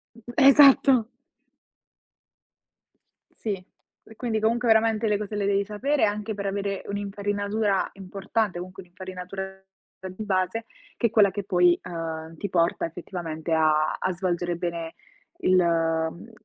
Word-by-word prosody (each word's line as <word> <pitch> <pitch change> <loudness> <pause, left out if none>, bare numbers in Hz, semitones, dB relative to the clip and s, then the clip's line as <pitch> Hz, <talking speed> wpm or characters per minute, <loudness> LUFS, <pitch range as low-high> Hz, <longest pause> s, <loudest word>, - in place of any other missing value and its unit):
Mh 230 - -15
mh 240 - -7
Esatto! 275 -4 +7 2.2
Sì, 200 -4 -4 0.4
pre 220 - -16
quindi 225 -2 -2
comunque 230 +2 +1
veramente 220 0 +3
le 210 -1 +1
cose 210 0 -5
le 200 -1 -1
devi 200 0 +2
sapere, 255 +8 0
anche 210 +1 -1
per 200 -1 -4
avere 200 0 -2
un'infarinatura 205 0 -1
importante, 195 +1 -2
comunque 185 +2 -8
un'infarinatura, 185 +1 -7 0.6
ehm, 185 -1 -7
di 215 - -5
base, 190 +2 -1 0.3
che 235 - +2
è - - -17
quella 210 -4 +5
che 200 +1 -5
poi, 180 -2 +4
uhm, 165 -2 -6
ti 200 - -4
porta 170 -2 +1
effettivamente 165 -1 -6
a 155 -1 +3
a 185 - -1
svolgere 175 -1 -2
bene 170 -2 -4 0.4
il 185 - +3
mhmm, 165 +2 0
195 Hz, 140 wpm, -25 LUFS, 175-215 Hz, 2.2 s, Esatto